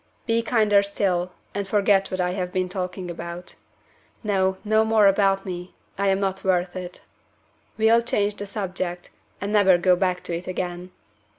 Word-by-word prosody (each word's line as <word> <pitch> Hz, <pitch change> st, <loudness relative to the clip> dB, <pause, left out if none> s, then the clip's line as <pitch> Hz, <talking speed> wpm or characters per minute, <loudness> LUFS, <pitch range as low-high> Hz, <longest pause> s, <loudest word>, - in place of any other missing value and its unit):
"Be 230 Hz, 0 st, +2 dB
kinder 215 Hz, -4 st, +3 dB
still, 185 Hz, -3 st, -1 dB, 0.2 s
and 200 Hz, -1 st, -3 dB
forget 195 Hz, -1 st, +3 dB
what 185 Hz, -, -4 dB
I 180 Hz, 0 st, +1 dB
have 180 Hz, -1 st, -3 dB
been 185 Hz, -1 st, 0 dB
talking 180 Hz, -1 st, -4 dB
about. 170 Hz, +1 st, -7 dB, 0.7 s
No! 190 Hz, -3 st, +1 dB
no 220 Hz, 0 st, +3 dB
more 220 Hz, -1 st, +4 dB
about 195 Hz, 0 st, +3 dB
me; 180 Hz, -1 st, -6 dB, 0.2 s
I 200 Hz, 0 st, 0 dB
am 195 Hz, 0 st, +2 dB
not 195 Hz, -1 st, -2 dB
worth 180 Hz, -1 st, +1 dB
it. 180 Hz, -1 st, -7 dB, 0.8 s
We'll 225 Hz, +1 st, +5 dB
change 210 Hz, -3 st, 0 dB
the 205 Hz, -, -5 dB
subject, 185 Hz, -3 st, -4 dB, 0.3 s
and 200 Hz, +2 st, -3 dB
never 190 Hz, -4 st, +5 dB
go 180 Hz, +1 st, +4 dB
back 180 Hz, 0 st, -1 dB
to 170 Hz, -, -3 dB
it 175 Hz, +2 st, -6 dB
again. 180 Hz, -1 st, -4 dB
190 Hz, 170 wpm, -24 LUFS, 180-205 Hz, 0.8 s, We'll